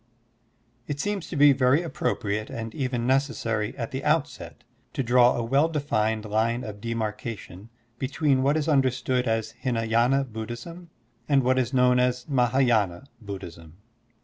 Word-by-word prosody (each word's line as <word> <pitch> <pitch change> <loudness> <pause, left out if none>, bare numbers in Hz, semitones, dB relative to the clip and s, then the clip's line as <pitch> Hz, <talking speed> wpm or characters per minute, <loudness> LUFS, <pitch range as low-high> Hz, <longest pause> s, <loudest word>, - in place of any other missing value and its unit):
IT 145 -1 -4
seems 205 0 -3
to - - -5
be 145 0 +6
very 130 +4 +3
appropriate 110 -9 -2
and 115 -1 -6
even 125 -3 -2
necessary 125 -5 0
at 115 -2 -4
the 135 +1 -4
outset 150 0 -1 0.3
to 135 - -1
draw 120 +1 +4
a 120 - -2
well 140 +7 +2
defined 110 -8 -1
line 115 +3 0
of 105 -3 -8
demarcation 110 -3 -5 0.3
between 140 0 +1
what 140 +3 +2
is 155 0 -1
understood 130 -3 +1
as 110 -1 -1
Hlnaydna 120 +1 +1
Buddhism 120 +11 -7 0.4
and 140 -2 +4
what 130 +1 +2
is 125 -1 -1
known 125 -1 +4
as 125 0 0
MahS,y^na 120 - +2 0.2
Buddhism. 85 -6 -9
125 Hz, 145 wpm, -25 LUFS, 110-135 Hz, 0.4 s, be